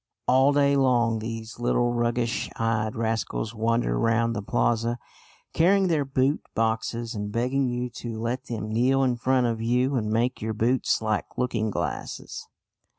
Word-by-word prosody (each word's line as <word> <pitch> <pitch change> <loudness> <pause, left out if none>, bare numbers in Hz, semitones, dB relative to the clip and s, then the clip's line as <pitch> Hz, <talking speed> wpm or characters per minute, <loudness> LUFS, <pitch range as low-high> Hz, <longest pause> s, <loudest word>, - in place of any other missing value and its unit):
All 130 +2 +5
day 140 -1 +3
long 120 -4 +2
these 115 0 -6
little 120 0 +1
roguish 120 0 -1
eyed 110 0 -1
rascals 115 -1 -2
wander 115 - 0
round 115 0 +1
the 105 - -2
plaza 115 +3 0 0.6
carrying 190 +3 +3
their 150 -4 +1
boot 135 +2 +1
boxes 115 +1 -1
and 105 -1 -4
begging 125 +4 0
you 125 0 -2
to 115 -2 -5
let 120 +3 -3
them 110 -2 -5
kneel 130 +4 +3
in 125 -2 +2
front 130 +1 +1
of 115 -1 -1
you 125 +4 +1
and 110 -4 -1
make 120 +3 0
your 110 +1 -2
boots 120 +1 +1
like 110 -1 -2
looking 120 -3 0
glasses. - - -5
120 Hz, 155 wpm, -26 LUFS, 115-130 Hz, 0.6 s, All